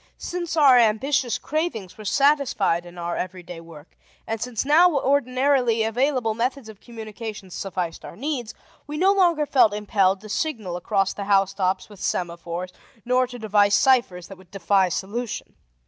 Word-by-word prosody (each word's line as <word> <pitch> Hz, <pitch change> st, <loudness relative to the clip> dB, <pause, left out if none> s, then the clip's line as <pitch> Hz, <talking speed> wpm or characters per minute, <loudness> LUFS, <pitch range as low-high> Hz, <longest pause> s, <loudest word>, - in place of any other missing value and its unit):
Since 345 Hz, -2 st, -4 dB
our 270 Hz, -5 st, +7 dB
ambitious 235 Hz, +2 st, +1 dB
cravings 295 Hz, -, -3 dB
were 215 Hz, -, -11 dB
satisfied 250 Hz, -, +1 dB
in 175 Hz, 0 st, -13 dB
our 170 Hz, 0 st, -3 dB
everyday 180 Hz, -2 st, -6 dB
work, 165 Hz, -2 st, -15 dB, 0.3 s
and 225 Hz, -1 st, -4 dB
since 250 Hz, 0 st, -3 dB
now 325 Hz, +3 st, +5 dB
ordinarily 255 Hz, -3 st, +2 dB
available 245 Hz, 0 st, 0 dB
methods 245 Hz, +2 st, -2 dB
of 210 Hz, -2 st, -13 dB
communication 220 Hz, -4 st, -8 dB
sufficed 180 Hz, -2 st, -4 dB
our -, -, -10 dB
needs, 255 Hz, -4 st, -4 dB, 0.3 s
we 300 Hz, +1 st, -5 dB
no 380 Hz, +4 st, +4 dB
longer 345 Hz, -6 st, +2 dB
felt 255 Hz, -7 st, +3 dB
impelled 200 Hz, -2 st, +1 dB
to 215 Hz, -, -11 dB
signal 220 Hz, -, -3 dB
across 195 Hz, +2 st, 0 dB
the 200 Hz, -, -6 dB
house 195 Hz, -1 st, +2 dB
tops 190 Hz, -1 st, -1 dB
with 205 Hz, -3 st, -15 dB
semaphores 175 Hz, +1 st, -4 dB, 0.3 s
nor 250 Hz, +1 st, +2 dB
to 245 Hz, 0 st, -9 dB
devise 205 Hz, -2 st, +3 dB
ciphers 205 Hz, -6 st, +2 dB
that 195 Hz, -2 st, -12 dB
would 185 Hz, -2 st, -19 dB
defy 195 Hz, 0 st, +1 dB
solution. 215 Hz, +7 st, -4 dB
220 Hz, 160 wpm, -23 LUFS, 190-265 Hz, 0.3 s, our